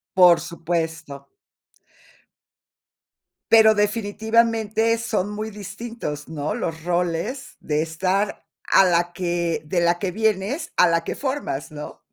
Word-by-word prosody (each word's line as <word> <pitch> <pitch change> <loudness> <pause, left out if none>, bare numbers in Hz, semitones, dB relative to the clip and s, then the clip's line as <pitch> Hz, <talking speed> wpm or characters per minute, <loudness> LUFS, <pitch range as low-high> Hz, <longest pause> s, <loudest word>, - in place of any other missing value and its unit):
Por 180 -2 +7
supuesto. 160 -4 -4 2.2
Pero 220 -1 +7
definitivamente 220 +1 +1
son 210 -4 -1
muy 215 +1 -4
distintos, 200 -6 -7
¿no? 155 +4 -3
Los 165 -9 -4
roles 175 - -2
de 150 0 -1
estar 185 +5 -1 0.2
a 195 - +5
la 175 0 +2
que 175 -2 -2
de 175 +3 0
la 170 0 +3
que 190 -3 -2
vienes, 215 - -1
a 180 - +6
la 165 0 +1
que - - -4
formas, 265 - -3
¿no? 150 0 -8
185 Hz, 120 wpm, -23 LUFS, 165-220 Hz, 2.2 s, Por